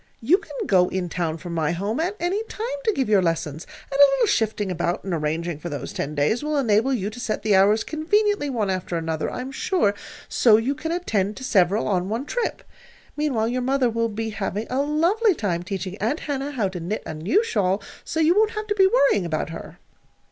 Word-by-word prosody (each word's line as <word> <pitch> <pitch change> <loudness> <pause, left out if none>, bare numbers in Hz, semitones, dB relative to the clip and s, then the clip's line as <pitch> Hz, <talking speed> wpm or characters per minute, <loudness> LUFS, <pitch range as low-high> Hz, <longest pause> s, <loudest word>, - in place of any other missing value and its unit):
"You 325 - +3
can 310 -8 -12
go 180 -2 +4
in 185 -2 -2
town 165 -2 -2
from 175 0 -7
my 160 -1 0
home 200 - -2
at 360 +5 -1
any 365 +5 0
time 445 0 -5 0.2
to 440 - +4
give 265 -6 0
your 205 -2 +4
lessons, 165 -3 -2 0.2
and 275 - -2
a 285 - +9
little 265 - +3
shifting 215 -3 0
about 175 +1 -1
and 190 - -3
arranging 160 +1 -2
for 175 - -6
those 145 - -5
ten 150 +2 -3
days 150 +11 +1
will 300 0 -1
enable 230 -1 +2
you 210 -5 -1
to 235 - -10
set 235 -3 -3
the 215 -1 +2
hours 205 +3 +4
conveniently 410 +1 +1
one 220 -7 -1
after 180 -2 -2
another, 160 -1 -2
I - - -5
am 260 +1 -6
sure, 270 - +1 0.3
so 220 -3 +5
you 240 +5 0
can 320 +3 -4
attend 215 - -1
to 265 - -8
several 200 -3 +2
on 185 -2 0
one 230 +6 -2
trip. 485 +8 -2 0.5
Meanwhile 260 -7 0
your 250 +1 -1
mother 260 -1 +1
will 230 0 0
be 220 +1 -4
having 210 +1 -3
a 260 +2 +1
lovely 345 +9 +2
time 180 - -1
teaching 190 +1 -5
Aunt 235 +10 -1
Hannah 280 -1 -3
how 225 -7 0
to 185 -1 -6
knit 180 +6 -3
a - - -5
new 190 - +1
shawl; 200 - +1 0.2
so 320 - -3
you 320 +2 +5
won't 435 +1 +2
have 425 - -2
to 415 -1 -1
be 385 -2 +6
worrying 280 - +3
about 155 0 -2
her." - - -9
220 Hz, 225 wpm, -23 LUFS, 185-290 Hz, 0.5 s, a